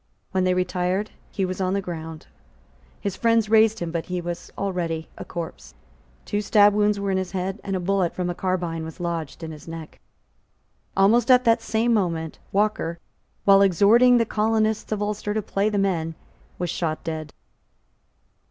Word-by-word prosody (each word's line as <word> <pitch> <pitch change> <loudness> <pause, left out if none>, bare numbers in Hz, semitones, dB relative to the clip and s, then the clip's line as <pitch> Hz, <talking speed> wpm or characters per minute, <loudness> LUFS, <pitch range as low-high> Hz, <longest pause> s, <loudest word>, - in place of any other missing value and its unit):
When 185 -1 +1
they 185 0 +2
retired, 180 +2 -1 0.2
he 195 - -1
was 185 +1 -4
on 185 +1 +1
the - - +1
ground. 160 -3 -7 0.7
His 200 -2 -3
friends 230 0 +2
raised 220 0 +5
him; 170 -5 -4
but 165 -1 -3
he 180 0 -2
was 175 0 -5
already 170 -5 -2
a - - -7
corpse. 170 -2 -7 0.5
Two 205 -1 -1
sabre 205 0 +5
wounds 210 -1 +2
were 200 -1 -1
on 190 - +1
his 185 -2 -3
head; 190 +2 -2
and 195 -1 -2
a - - 0
bullet 185 -1 0
from 180 -1 -2
a 175 - -1
carbine 175 -3 -2
was 160 -1 -8
lodged 170 -2 -4
in 160 - -5
his 155 0 -11
neck. 165 -1 -8 1.0
Almost 220 +5 +4
at 250 0 +6
the 230 -1 +6
same 225 +1 +1
moment 165 -6 -1
Walker, 200 -5 0 0.5
while 195 0 +7
exhorting 210 +7 +5
the 230 - +3
colonists 220 0 0
of 210 -1 0
Ulster 210 0 -2
to 215 - +1
play 200 +2 0
the 210 - -1
men, 170 -5 0 0.4
was 175 -2 -2
shot 160 -3 -2
dead. 155 -2 -5
190 Hz, 180 wpm, -24 LUFS, 170-210 Hz, 1.0 s, while